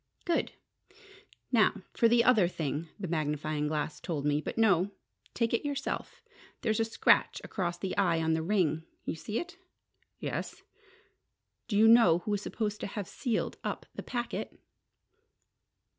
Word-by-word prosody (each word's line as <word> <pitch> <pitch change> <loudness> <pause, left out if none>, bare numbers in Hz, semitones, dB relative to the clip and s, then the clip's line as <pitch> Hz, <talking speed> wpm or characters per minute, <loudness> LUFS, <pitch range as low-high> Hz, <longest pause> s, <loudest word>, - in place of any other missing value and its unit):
"Good! 340 - 0 1.0
Now - - +3
for 230 - +4
the 235 0 +5
other 225 -8 +5
thing 160 -2 -3
the 190 - -3
magnifying 150 -2 -1
glass 150 0 -2
told 150 -4 -3
me. 150 0 +2
But - - -5
no 200 -4 +4 0.5
take 230 -1 +1
it 230 - +1
yourself. 285 -2 -4 0.4
There's 220 -2 +1
a 225 - +3
scratch 225 - +3
across 175 -3 -2
the 185 +1 -3
eye 175 -5 +3
on 160 0 +1
the 160 - +1
ring. 165 -3 +1 0.2
You - - -1
see 210 +7 -4
it?" 350 +1 -8 0.6
"Yes." - - -5 1.0
"Do 210 -4 0
you 220 +1 +7
know 225 -8 +7
who 195 +4 -4
was 205 -1 0
supposed 210 -1 -3
to - - -2
have 200 -2 -5
sealed 235 -5 -2
up - - -3
the - - -6
packet?" 240 -1 -4
195 Hz, 155 wpm, -30 LUFS, 160-225 Hz, 1.0 s, you